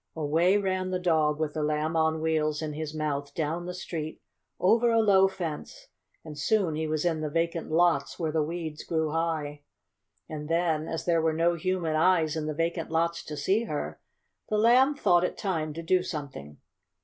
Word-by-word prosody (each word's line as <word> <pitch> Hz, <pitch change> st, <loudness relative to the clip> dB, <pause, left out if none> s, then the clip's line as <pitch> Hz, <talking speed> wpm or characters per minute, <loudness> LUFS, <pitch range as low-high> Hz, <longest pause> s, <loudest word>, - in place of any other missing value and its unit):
Away 165 Hz, +5 st, +2 dB
ran 185 Hz, -2 st, -1 dB
the 185 Hz, -, 0 dB
dog 160 Hz, -4 st, +1 dB
with 155 Hz, -2 st, -1 dB
the 155 Hz, -, -2 dB
Lamb 150 Hz, +2 st, -1 dB
on 160 Hz, 0 st, +1 dB
Wheels 155 Hz, -1 st, 0 dB
in 155 Hz, -1 st, -3 dB
his 155 Hz, 0 st, -4 dB
mouth 145 Hz, -2 st, -3 dB
down 165 Hz, +2 st, -2 dB
the 180 Hz, -, -4 dB
street, 160 Hz, -3 st, -5 dB, 0.4 s
over 230 Hz, +6 st, +4 dB
a 230 Hz, 0 st, +3 dB
low 195 Hz, -3 st, +5 dB
fence, 170 Hz, -6 st, -6 dB, 0.4 s
and 155 Hz, -2 st, -8 dB
soon 195 Hz, 0 st, +1 dB
he 155 Hz, +1 st, -2 dB
was 155 Hz, +1 st, -1 dB
in 165 Hz, -3 st, 0 dB
the 155 Hz, -, -2 dB
vacant 165 Hz, +1 st, -1 dB
lots 170 Hz, +1 st, +2 dB
where 160 Hz, -2 st, -1 dB
the 160 Hz, 0 st, +1 dB
weeds 160 Hz, -1 st, -4 dB
grew 160 Hz, -2 st, -1 dB
high. 155 Hz, -3 st, -2 dB, 0.7 s
And 150 Hz, -1 st, -6 dB
then, 165 Hz, -2 st, +1 dB
as 165 Hz, -, -4 dB
there 170 Hz, -2 st, +2 dB
were 160 Hz, 0 st, +1 dB
no 165 Hz, +2 st, +2 dB
human 170 Hz, -2 st, -1 dB
eyes 160 Hz, -1 st, +3 dB
in 155 Hz, -1 st, -3 dB
the 155 Hz, -, -3 dB
vacant 165 Hz, +1 st, -2 dB
lots 170 Hz, +1 st, 0 dB
to 150 Hz, -, -6 dB
see 195 Hz, +10 st, +1 dB
her, -, -, -4 dB, 0.5 s
the 215 Hz, -, +1 dB
Lamb 250 Hz, +6 st, +5 dB
thought 175 Hz, -9 st, +3 dB
it 180 Hz, -, -2 dB
time 160 Hz, -6 st, -2 dB
to 165 Hz, -, -5 dB
do 180 Hz, +2 st, +3 dB
something. 140 Hz, -, -7 dB
160 Hz, 195 wpm, -28 LUFS, 155-180 Hz, 0.7 s, low